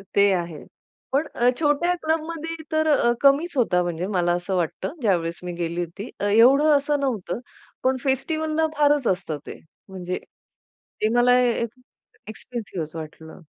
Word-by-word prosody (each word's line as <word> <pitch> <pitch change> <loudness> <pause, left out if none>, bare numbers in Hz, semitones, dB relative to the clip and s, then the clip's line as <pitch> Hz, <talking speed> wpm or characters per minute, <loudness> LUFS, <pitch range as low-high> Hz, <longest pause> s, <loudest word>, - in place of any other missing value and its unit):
ते 200 0 +5
आहे 170 -4 -3 0.5
पण 285 +4 +1
अ, 240 +1 +4
छोट्या 320 +3 +2
क्लबमध्ये 325 +1 -2 0.2
तर 315 0 +1
अ, 280 -6 +4
कमीच 290 +4 +3
होता 190 -8 +3
म्हणजे 175 +1 -3
मला 180 -4 +1
असं 175 +2 -2
वाटतं 175 - -2
ज्यावेळेस 170 -6 0
मी 180 0 -4
गेली 170 0 -3
होती. 175 +7 -8
अ, - - -1
एवढं 250 +9 +5
असं 290 +1 0
नव्हतं 230 -8 -2 0.4
पण 260 0 +2
फेस्टिव्हलला 310 +4 0
फारच 290 -3 +3
असतं 180 -5 -1
ते - - -8 0.3
म्हणजे 185 -1 -4 0.8
ते 215 - +3
मला 245 +1 +5
एक 235 -1 +1 0.6
एक्सपेन्सिव्ह 220 -6 -6
असं 155 +1 -7
वाटलं. 160 +2 -10
235 Hz, 150 wpm, -24 LUFS, 175-290 Hz, 0.8 s, ते